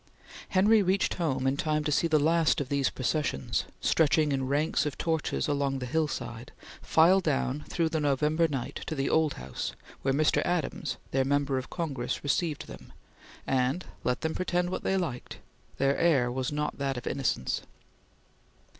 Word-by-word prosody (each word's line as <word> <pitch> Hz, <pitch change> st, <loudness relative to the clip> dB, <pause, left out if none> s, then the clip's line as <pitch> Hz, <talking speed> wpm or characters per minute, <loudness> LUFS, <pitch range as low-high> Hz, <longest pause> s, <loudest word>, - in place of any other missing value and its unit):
Henry 205 Hz, +3 st, +5 dB
reached 190 Hz, 0 st, +1 dB
home 135 Hz, -7 st, -1 dB
in 135 Hz, +1 st, +2 dB
time 155 Hz, 0 st, 0 dB
to 150 Hz, -, -1 dB
see 170 Hz, -, +2 dB
the 155 Hz, -2 st, +3 dB
last 160 Hz, +2 st, +3 dB
of 140 Hz, -3 st, -3 dB
these 140 Hz, -1 st, +1 dB
processions, 130 Hz, -, -1 dB, 0.2 s
stretching 155 Hz, -1 st, +3 dB
in 135 Hz, -1 st, -1 dB
ranks 145 Hz, +3 st, +1 dB
of 145 Hz, -, -5 dB
torches 160 Hz, -2 st, -1 dB
along 140 Hz, -2 st, 0 dB
the 130 Hz, -, -4 dB
hillside, 125 Hz, -4 st, -3 dB, 0.3 s
file 170 Hz, +4 st, +5 dB
down 150 Hz, -4 st, -1 dB
through 165 Hz, -2 st, +1 dB
the 160 Hz, -1 st, -1 dB
November 150 Hz, +3 st, +2 dB
night; 135 Hz, -5 st, -4 dB
to 155 Hz, -, -2 dB
the 135 Hz, -1 st, -1 dB
Old 160 Hz, -2 st, +3 dB
House, 65 Hz, +1 st, -5 dB, 0.3 s
where 135 Hz, -, +1 dB
Mr. 150 Hz, +3 st, +3 dB
Adams, 175 Hz, -3 st, -2 dB
their 135 Hz, 0 st, +2 dB
Member 140 Hz, 0 st, +1 dB
of 130 Hz, -, -8 dB
Congress, 140 Hz, -8 st, -3 dB
received 150 Hz, +1 st, 0 dB
them, -, -, -12 dB, 0.5 s
and, 135 Hz, +6 st, 0 dB, 0.2 s
let 125 Hz, 0 st, 0 dB
them 160 Hz, 0 st, -1 dB
pretend 180 Hz, -1 st, -1 dB
what -, -, -3 dB
they 190 Hz, -, 0 dB
liked, 150 Hz, -10 st, -4 dB, 0.4 s
their 135 Hz, 0 st, +2 dB
air 140 Hz, -8 st, +3 dB
was 130 Hz, +1 st, -2 dB
not 150 Hz, 0 st, -2 dB
that 135 Hz, -2 st, -1 dB
of 120 Hz, -, -6 dB
innocence. 125 Hz, -, -1 dB
145 Hz, 170 wpm, -29 LUFS, 135-160 Hz, 0.5 s, Henry